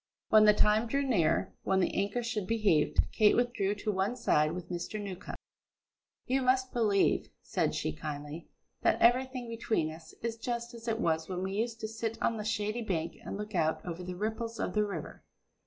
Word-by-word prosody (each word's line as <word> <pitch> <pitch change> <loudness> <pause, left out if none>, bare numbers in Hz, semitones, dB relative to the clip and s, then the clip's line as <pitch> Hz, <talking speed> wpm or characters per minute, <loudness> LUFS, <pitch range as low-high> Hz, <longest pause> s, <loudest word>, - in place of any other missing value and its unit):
When 215 -1 +7
the 210 - +8
time 215 +3 +4
drew 275 +4 0
near 190 - +2
when 190 0 +1
the 185 - +1
anchor 205 +5 0
should 220 -5 -2
be 230 - +1
heaved, 165 -9 +3
Kate 210 -1 +5
withdrew 240 -5 +1
to 210 +1 -2
one 195 +4 0
side 155 -11 +2
with 180 0 -7
Mr. 175 +5 -4
Newcombe. 200 -2 -6 0.9
"You 265 +1 +1
must 255 0 +2
believe," 210 -5 +2
said - - 0
she 80 - -1
kindly, 150 - -6 0.3
"that - - +3
everything 255 +1 +3
between 225 -8 -1
us 160 0 -12
is 230 -1 -2
just 235 +1 -3
as 230 0 -10
it 225 -1 0
was 160 0 0
when 185 0 -3
we 190 0 -2
used 225 +2 -2
to 220 - -2
sit 225 0 -4
on 230 - +1
the 210 - -3
shady 215 +1 -1
bank 170 -6 -2
and - - -5
look 210 +1 -6
out 160 -3 0
over 175 0 -5
the 180 0 -5
ripples 225 +3 -3
of - - -2
the 210 - +3
river. 205 -1 -6
210 Hz, 200 wpm, -31 LUFS, 180-230 Hz, 0.9 s, the